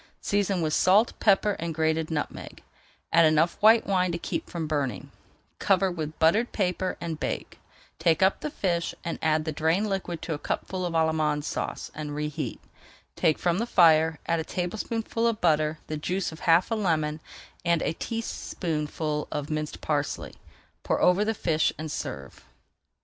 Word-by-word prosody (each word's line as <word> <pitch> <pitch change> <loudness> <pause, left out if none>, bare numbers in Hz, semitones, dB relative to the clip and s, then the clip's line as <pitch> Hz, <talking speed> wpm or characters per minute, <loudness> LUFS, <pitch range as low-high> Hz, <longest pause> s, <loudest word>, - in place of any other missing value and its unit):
Season 200 -3 0
with 155 -1 0
salt, 200 +8 +4
pepper, 205 0 +4
and 165 -1 -3
grated 160 0 0
nutmeg, 150 -3 -5 0.5
add 165 +1 +7
enough 155 +2 +3
white 220 +2 +6
wine 185 -2 +1
to 170 - -2
keep - - -4
from 170 -2 -3
burning, 140 -9 -2 0.5
cover 190 -1 +2
with 155 -3 -5
buttered 205 +9 +3
paper, 185 -2 -1
and 165 -2 -4
bake. - - -4 0.4
Take 165 +2 +3
up 190 - +3
the 300 - -3
fish 175 - -1
and 170 - -4
add 155 -1 +1
the 160 - -1
drained 160 +7 +1
liquid 180 -4 -3
to 165 - -2
a 145 - -4
cupful 185 +3 -3
of 170 - -5
Allemande 155 -2 +1
Sauce - - -4
and 150 -1 -5
reheat. 150 -3 -3 0.6
Take 155 - +2
from 175 +1 0
the 230 - -1
fire, 160 -5 +5
add 165 0 +1
a - - -1
tablespoonful 220 +7 -2
of 225 -2 0
butter, 155 -2 +2
the 155 - -4
juice 180 +5 -2
of 160 - -10
half 170 +6 +5
a - - +2
lemon, 155 -7 0 0.4
and 170 -1 +2
a 155 - 0
teaspoonful 155 -9 -3
of 150 +1 -3
minced 155 0 -3
parsley. 145 -2 -2 0.5
Pour - - 0
over 180 +3 +4
the 220 +1 -1
fish 160 -5 +1
and 155 -1 -5
serve. 70 - -6
165 Hz, 170 wpm, -27 LUFS, 155-185 Hz, 0.6 s, add